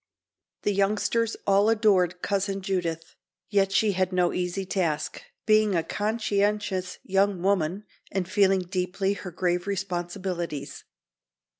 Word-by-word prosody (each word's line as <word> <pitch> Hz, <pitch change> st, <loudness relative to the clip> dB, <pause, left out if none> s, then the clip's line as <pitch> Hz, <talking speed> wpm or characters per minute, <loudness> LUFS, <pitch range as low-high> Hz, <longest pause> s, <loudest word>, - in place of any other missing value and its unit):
The 205 Hz, -, +1 dB
youngsters 210 Hz, +3 st, +1 dB
all 200 Hz, +2 st, +4 dB
adored 190 Hz, -5 st, +2 dB
Cousin 195 Hz, -1 st, -1 dB
Judith, 170 Hz, -4 st, -2 dB, 0.4 s
yet 195 Hz, -2 st, +3 dB
she 210 Hz, +1 st, +3 dB
had 185 Hz, 0 st, 0 dB
no 180 Hz, -1 st, +2 dB
easy 180 Hz, +2 st, -2 dB
task, 160 Hz, -5 st, -1 dB, 0.2 s
being 215 Hz, -2 st, +4 dB
a 165 Hz, -, +1 dB
conscientious 205 Hz, -3 st, -1 dB
young 195 Hz, -1 st, +1 dB
woman 190 Hz, 0 st, +1 dB, 0.3 s
and 190 Hz, -2 st, -1 dB
feeling 195 Hz, -1 st, +3 dB
deeply 185 Hz, +2 st, -1 dB
her 200 Hz, -2 st, -7 dB
grave 180 Hz, +1 st, -1 dB
responsibilities. 180 Hz, -4 st, -4 dB
195 Hz, 120 wpm, -26 LUFS, 180-200 Hz, 0.4 s, all